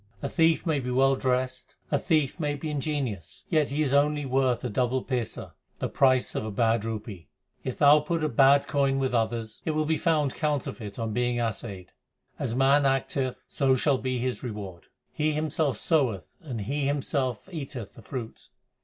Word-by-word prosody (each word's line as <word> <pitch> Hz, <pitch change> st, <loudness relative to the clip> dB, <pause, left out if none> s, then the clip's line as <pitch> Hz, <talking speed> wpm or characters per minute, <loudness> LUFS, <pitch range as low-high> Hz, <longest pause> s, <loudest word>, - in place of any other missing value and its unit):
A -, -, -1 dB
thief 165 Hz, +1 st, +2 dB
may 160 Hz, -4 st, +1 dB
be 125 Hz, -1 st, -4 dB
well 135 Hz, +2 st, +3 dB
dressed, 130 Hz, 0 st, -2 dB, 0.2 s
a 145 Hz, -, +2 dB
thief 155 Hz, 0 st, +1 dB
may 145 Hz, -2 st, -1 dB
be 150 Hz, +2 st, -4 dB
ingenious, 135 Hz, -, -3 dB
Yet 155 Hz, -3 st, +3 dB
he 150 Hz, +3 st, 0 dB
is 140 Hz, -2 st, 0 dB
only 145 Hz, +1 st, +2 dB
worth 130 Hz, -2 st, +1 dB
a -, -, -2 dB
double 125 Hz, +3 st, 0 dB
paisa, 125 Hz, -5 st, -3 dB, 0.3 s
the -, -, -2 dB
price 130 Hz, -2 st, +3 dB
of -, -, -2 dB
a 110 Hz, -, -4 dB
bad 115 Hz, +1 st, +1 dB
rupee. 105 Hz, -7 st, -6 dB, 0.4 s
If 130 Hz, -, -4 dB
thou 145 Hz, +1 st, +7 dB
put 160 Hz, +2 st, -2 dB
a -, -, +3 dB
bad 140 Hz, +1 st, +5 dB
coin 140 Hz, -1 st, +1 dB
with 130 Hz, -2 st, 0 dB
others, 115 Hz, -1 st, -1 dB
It 155 Hz, -, -1 dB
will 155 Hz, 0 st, +1 dB
be 160 Hz, +1 st, 0 dB
found 155 Hz, -5 st, +1 dB
counterfeit 135 Hz, -8 st, -3 dB
on 115 Hz, -2 st, -3 dB
being 120 Hz, 0 st, 0 dB
assayed. 105 Hz, -5 st, -4 dB, 0.5 s
As 115 Hz, -, -2 dB
man 135 Hz, +2 st, +4 dB
acteth, 135 Hz, -1 st, 0 dB
so 135 Hz, -2 st, +2 dB
shall 135 Hz, +1 st, +2 dB
be 130 Hz, -1 st, -2 dB
his 125 Hz, +1 st, -2 dB
reward: 100 Hz, -7 st, -7 dB, 0.3 s
He 155 Hz, 0 st, 0 dB
himself 150 Hz, -4 st, 0 dB
soweth 130 Hz, -, +1 dB, 0.2 s
and 130 Hz, -, -5 dB
he 140 Hz, +6 st, -1 dB
himself 135 Hz, -, -1 dB
eateth 135 Hz, -, -6 dB
the -, -, -13 dB
fruit. 120 Hz, -1 st, -7 dB
135 Hz, 185 wpm, -27 LUFS, 120-145 Hz, 0.5 s, thou